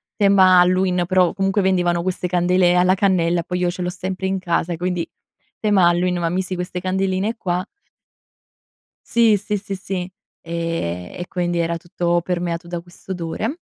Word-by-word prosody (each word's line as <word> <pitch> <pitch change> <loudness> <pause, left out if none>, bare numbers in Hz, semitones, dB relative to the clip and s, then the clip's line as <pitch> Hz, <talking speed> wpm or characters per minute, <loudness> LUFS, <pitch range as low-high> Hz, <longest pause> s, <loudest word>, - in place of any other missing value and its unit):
tema 190 -3 +6
Halloween 180 0 +2
però, 185 -2 +3
comunque 195 +1 +1
vendevano 175 -2 +1
queste 180 0 -2
candele 180 0 +3
alla 180 +1 +4
cannella, 175 -3 +2
poi 180 +2 -3
io 180 - +1
ce 180 +1 -5
l'ho 180 - -1
sempre 185 +1 -4
in 190 0 0
casa 170 -1 -1
quindi, 180 -1 -2 0.5
tema 200 -5 +4
Halloween 180 +1 +1
ma 170 -1 0
misi 185 +1 -2
queste 180 0 -4
candeline 190 +3 -1
qua. 180 -3 -1 1.5
Sì, 230 -3 +4
sì, 210 +1 -3
sì, 200 0 -5
sì. 185 -1 -5 0.3
Ehm, 165 - -3
e 175 - -5
quindi 175 -1 -1
era 170 0 0
tutto 175 0 -1
permeato 175 -1 -3
da 170 -1 -4
quest'odore. 180 - -5
180 Hz, 160 wpm, -21 LUFS, 175-190 Hz, 1.5 s, tema